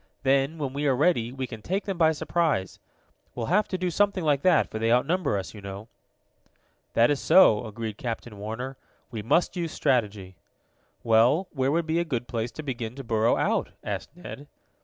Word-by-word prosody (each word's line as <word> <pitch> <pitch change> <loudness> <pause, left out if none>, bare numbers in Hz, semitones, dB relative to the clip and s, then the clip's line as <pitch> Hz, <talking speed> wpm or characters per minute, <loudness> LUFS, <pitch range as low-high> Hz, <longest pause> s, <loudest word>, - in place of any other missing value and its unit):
Then, 135 +3 +2
when 140 -4 -3
we 145 +1 -1
are 135 - +3
ready, 125 -5 +2
we 130 0 -4
can 115 -3 -9
take 190 - -2
them 195 -2 -2
by 160 -2 +4
surprise. 150 - -1 0.6
We'll 120 - -3
have 210 +2 +3
to 185 - -3
do 180 -1 -1
something 200 0 +1
like 145 -3 +2
that, 180 -2 +4
for 110 - -4
they 115 +1 +1
outnumber 140 - +2
us, 95 - -5
you 105 - -10
know." 100 +3 -8 1.0
"That 115 +4 +4
is 145 - 0
so," 120 - +5
agreed 110 -1 -6
Captain 115 -3 -5
Warner. 125 +6 -5 0.3
"We 110 -3 -4
must 145 - +1
use 170 -3 -3
strategy." 100 -7 -1 0.7
"Well, 120 +11 +3
where 135 -2 0
would 165 +2 +1
be 160 +1 0
a - - +1
good 125 -7 -3
place 115 -1 -2
to 155 - -7
begin 120 -4 -4
to 135 - -7
burrow 115 -1 +2
out?" - - 0
asked 100 -2 -4
Ned. 145 -5 -9
130 Hz, 195 wpm, -26 LUFS, 115-160 Hz, 1.0 s, so